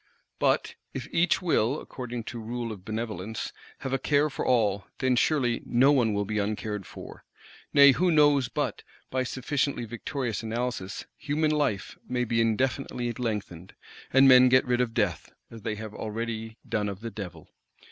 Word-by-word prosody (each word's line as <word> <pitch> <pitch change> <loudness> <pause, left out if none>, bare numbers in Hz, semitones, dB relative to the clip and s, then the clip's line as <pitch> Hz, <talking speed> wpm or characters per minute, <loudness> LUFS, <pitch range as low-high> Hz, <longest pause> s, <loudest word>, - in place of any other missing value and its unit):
But - - +2 0.2
if - - -4
each 175 +2 +2
will, 140 -5 +2
according 125 -3 -6
to 120 +1 -6
rule 115 +1 -4
of 100 -4 -9
Benevolence, 110 -1 -4 0.3
have 135 - -3
a 135 - +1
care 145 0 +2
for - - -3
all, 105 -6 +2
then 130 -1 +2
surely—no 125 -1 +3
one 120 -7 +3
will 100 0 0
be 105 +1 -1
uncared 105 -1 -3
for. - - -11 0.5
Nay, 140 -1 +8
who 180 +7 +2
knows 145 -5 +4
but, - - -2 0.3
by 130 - 0
sufficiently 130 0 -1
victorious 120 +1 -3
Analysis, 115 -4 -3
"human 155 +1 0
life 145 -11 -1
may 125 -1 0
be 115 -1 +1
indefinitely 120 +1 0
lengthened," 105 -8 -4 0.4
and 135 +1 +7
men 130 -1 +8
get 130 +1 +5
rid 125 -1 +1
of 115 -2 -2
Death, 110 -4 -1 0.2
as 115 -1 -10
they 110 0 -2
have 110 0 -7
already 110 +1 -4
done 105 -2 -1
of 100 0 -7
the 115 0 -5
Devil? 90 -6 -8
120 Hz, 165 wpm, -27 LUFS, 110-130 Hz, 0.5 s, Nay